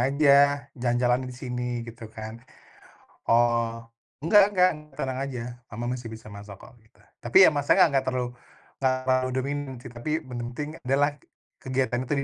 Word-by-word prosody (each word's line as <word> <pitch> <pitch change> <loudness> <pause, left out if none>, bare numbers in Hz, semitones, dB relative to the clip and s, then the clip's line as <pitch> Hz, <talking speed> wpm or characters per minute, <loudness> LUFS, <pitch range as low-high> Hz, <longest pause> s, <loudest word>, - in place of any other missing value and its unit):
aja, 140 0 +4
jalan-jalan 120 +1 +1
di - - -8
sini," 125 -1 -4
gitu 115 -1 -10
kan. 110 +1 -9 0.9
Oh, 115 -1 +2 0.4
"Enggak 200 +4 +6
enggak, 180 0 +6 0.3
tenang 130 -1 -3
aja, 125 -3 -5
Mama 115 +2 -6
masih 125 -2 -5
bisa 110 -1 -10
masak 100 0 -10
kok, - - -13
kita" 110 -1 -27 0.2
Tapi 120 +11 +6
ya - - +8
masaknya 145 +2 +4
enggak 135 -1 +2
terlalu 125 -1 -1 0.5
enggak 130 -1 +2
terlalu 130 0 +1
dominan 140 +1 -3
sih, 125 - -9
tapi 120 +5 -7
yang - - -18
penting 125 +5 -5
adalah 140 +3 +2 0.5
kegiatan 130 -1 -1
itu 145 - -1
125 Hz, 155 wpm, -26 LUFS, 120-140 Hz, 0.9 s, ya